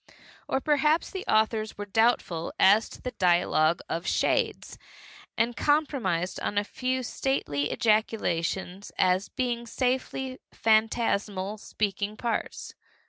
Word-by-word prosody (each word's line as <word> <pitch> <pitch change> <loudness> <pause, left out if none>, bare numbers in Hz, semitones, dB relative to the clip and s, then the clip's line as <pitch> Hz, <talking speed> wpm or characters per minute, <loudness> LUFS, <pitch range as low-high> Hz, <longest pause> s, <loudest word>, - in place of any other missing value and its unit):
Or 265 - +1
perhaps 300 +3 +2
the 380 -1 -5
authors 215 0 +1
were 205 - -5
doubtful 205 -6 +1
as 205 +3 +5
to - - -13
the 250 - -3
dialogue 175 -5 +2
of 170 +2 -3
shades, - - 0 0.6
and 235 +1 +1
compromised 245 - 0
on 205 - -3
a 205 - +3
few 255 +4 -2
stately 150 - -1
ejaculations 195 -4 0
as 185 +1 +2
being 240 -2 -2
safely 260 +1 -2
phantasmal 215 -2 +1
speaking 205 0 -3
parts. 235 -1 -3
215 Hz, 115 wpm, -27 LUFS, 190-250 Hz, 0.6 s, as